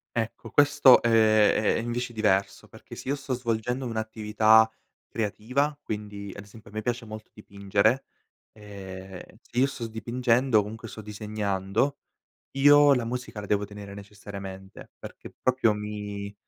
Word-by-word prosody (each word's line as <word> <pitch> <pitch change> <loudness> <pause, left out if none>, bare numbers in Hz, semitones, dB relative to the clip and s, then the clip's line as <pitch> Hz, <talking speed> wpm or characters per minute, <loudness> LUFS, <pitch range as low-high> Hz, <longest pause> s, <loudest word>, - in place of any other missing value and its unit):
Ecco, 115 0 -3
questo, 145 -2 +6
ehm, 120 - +2
è 110 -1 +4
è - - 0
invece 120 +1 -3
diverso 100 -3 0
perché - - -13
se - - -7
io 140 - +1
sto 135 -2 -5
svolgendo 120 +1 -2
un'attività 110 -1 +3 0.4
creativa, 125 +7 -2
quindi 105 -3 -6
ad 100 - -8
esempio, 105 0 -15
a - - -20
me 110 - -3
piace 120 0 -3
molto 110 0 -10
dipingere, 100 +4 0 0.5
ehm, 95 -3 -10 0.2
se 120 - -5
io 135 - +4
sto 125 -4 -6
dipingendo, 120 +1 +1
comunque 110 +2 -8
sto 110 - -9
disegnando, 105 +4 -2 0.5
io 145 +1 +6
la 125 - 0
musica 125 -2 -5
la 105 - -7
devo 105 0 +1
tenere 100 -1 -10
necessariamente 100 -1 -10
perché - - -11
proprio 130 -4 +2
mi 105 -1 -6
110 Hz, 145 wpm, -26 LUFS, 105-120 Hz, 0.5 s, questo